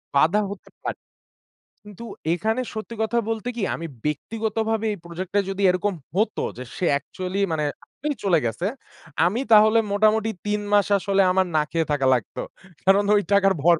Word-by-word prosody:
বাধা 165 +9 +4
হতে 205 - -10
পা - - -1 0.9
কিন্তু 210 +2 -11 0.3
এখানে 220 +8 0
সত্যি 220 +2 -6
কথা 235 +2 +1
বলতে 225 +2 -2
কি 225 - -3
আমি 165 - -5 0.2
ব্যক্তিগতভাবে 220 +7 -1
এই 205 - -6
project 175 +2 -6
টায় 200 -2 +2
যদি 195 +1 -3
এরকম 185 +2 0 0.2
হতো 215 +1 +1
যে 125 - -6
সে 180 - -1
actually 185 +6 -5
মানে 150 -1 0 0.4
মি 300 - +1
চলে 175 -4 +4
গেছে, 115 - -2 0.6
আমি 220 +8 0
তাহলে 215 +1 +7
মোটামুটি 215 +1 +3 0.2
৩ 210 0 0
মাস 205 -2 +5
আসলে 195 +1 +2
আমার 190 0 +2
না - - +4
খেয়ে 165 -2 0
থাকা 135 -2 +1
লাগতো। 120 -4 -3 0.4
কারণ 195 +2 +5
ওই 205 - +4
টাকার 195 -1 +5
ভর 170 0 +6
200 Hz, 170 wpm, -23 LUFS, 175-215 Hz, 0.9 s, তাহলে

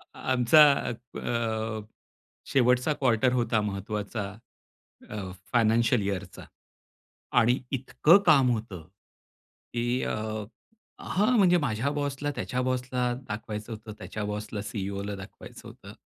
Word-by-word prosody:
आमचा 130 +4 +5 0.2
अ, 115 -2 -3 0.7
शेवटचा 125 +3 +3
क्वार्टर 125 -2 +2
होता 120 -3 +1
महत्वाचा 105 +1 -3 0.9
अ, 100 -3 -5 0.2
फायनान्शिअल 115 0 +3
इयरचा 95 -2 -4 0.9
आणि 120 +2 +3
इतकं 140 +6 +4
काम 135 -5 +6
होतं. 100 -8 -5 0.9
की 120 +1 0
अ - - -1 0.9
हां, 215 +6 +1
म्हणजे 180 -3 +5
माझ्या 135 -2 -1
बॉसला 145 0 -2
त्याच्या 125 - -2
बॉसला 125 0 -1 0.2
दाखवायचं 105 +1 -5
होतं, 110 0 -8
त्याच्या 105 0 -5
बॉसला 105 0 -4
CEO 100 -1 -3
ला 105 - -4
दाखवायचं 95 +1 -11
होतं. - - -12
115 Hz, 110 wpm, -27 LUFS, 105-130 Hz, 0.9 s, काम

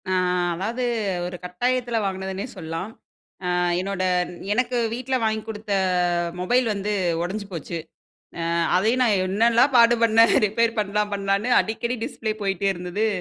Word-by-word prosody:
அ - - 0 0.4
அதாவது 220 +9 -3 0.4
ஒரு 180 0 -5
கட்டாயத்துல 240 +6 -1
வாங்குனதுன்னே 190 +1 -3
சொல்லாம். 165 +4 -5 0.5
அ - - -1 0.3
என்னோட 190 0 -2 0.5
எனக்கு 250 +2 0 0.2
வீட்ல 255 +2 -2
வாங்கிக் 220 0 -1
குடுத்த 210 -1 -4 0.7
மொபைல் 245 +8 +2
வந்து 205 +1 -2 0.3
ஒடஞ்சு 200 +4 -3
போச்சு. 170 0 -5 0.6
அ - - -2 0.3
அதையும் 225 +7 +2
நான் 220 -5 +3
என்னெல்லாம் 230 +7 +3
பாடுபன்னேன் 230 -1 +5
ரிப்பேர் 230 +2 0
பண்லாம் 210 0 0
பண்லான்னு. 200 +3 0
அடிக்கடி 235 +3 -2
டிஸ்ப்ளே 220 -1 -3
போயிட்டே 195 0 0
இருந்தது. 180 +4 -2
210 Hz, 125 wpm, -23 LUFS, 190-230 Hz, 0.7 s, பாடுபன்னேன்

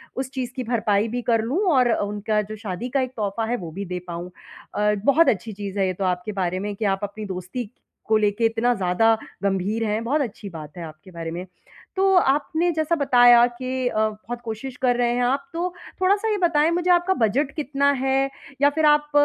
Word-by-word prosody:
उस 260 0 -3
चीज़ 255 -2 -3
की 255 - -3
भरपाई 220 -3 +1
भी 245 +2 -3
कर 230 -2 +2
लूँ 265 +10 -1
और 250 -2 +4
उनका 210 +1 -1
जो 215 +1 -7
शादी 215 +2 -5
का 270 +2 +1
एक 255 -1 -3
तोहफ़ा 210 +1 -2
है, 240 +2 -1
वो 170 -6 -7
भी 200 +5 -5
दे 180 0 -4
पाऊँ। 175 +1 -6 0.4
अ, 210 0 +2
बहुत 320 +4 +5
अच्छी 220 +1 -2
चीज़ 200 0 -5
है 195 - +3
ये 185 - -1
तो 195 - -4
आपके 180 +3 -1
बारे 180 +1 -1
में 205 +1 -3
कि 215 - -3
आप 195 -1 +1
अपनी 205 +1 -5
दोस्ती 190 +4 -5 0.4
को 220 0 +3
लेके 210 +2 +1
इतना 225 +2 +2
ज़्यादा 215 +4 +2 0.3
गंभीर 200 +3 0
हैं, 215 +1 -1
बहुत 285 +6 +1
अच्छी 210 -5 -5
बात 155 -2 -10
है 175 - -6
आपके 155 +3 -11
बारे 165 -1 -6
में। 175 +2 -5 0.5
तो 385 0 +3
आपने 320 +4 +2
जैसा 315 +1 0
बताया 245 -5 +6
कि 255 +1 -3
अ, - - -3
बहुत 225 +3 -8
कोशिश 240 +4 -6
कर 245 -1 +3
रहे 240 -1 +2
हैं 245 - +1
आप, 270 +3 0
तो 345 +2 -1 0.3
थोड़ा-सा 400 +4 +2
ये 415 - +1
बताएँ 330 -3 +3
मुझे, 350 +1 0
आपका 350 +2 +3
बजट 270 +6 0
कितना 280 -1 +1
है 270 0 +2 0.3
या 285 - +6
फिर 310 +2 0
आप 295 0 +3
230 Hz, 220 wpm, -23 LUFS, 200-275 Hz, 0.5 s, बताया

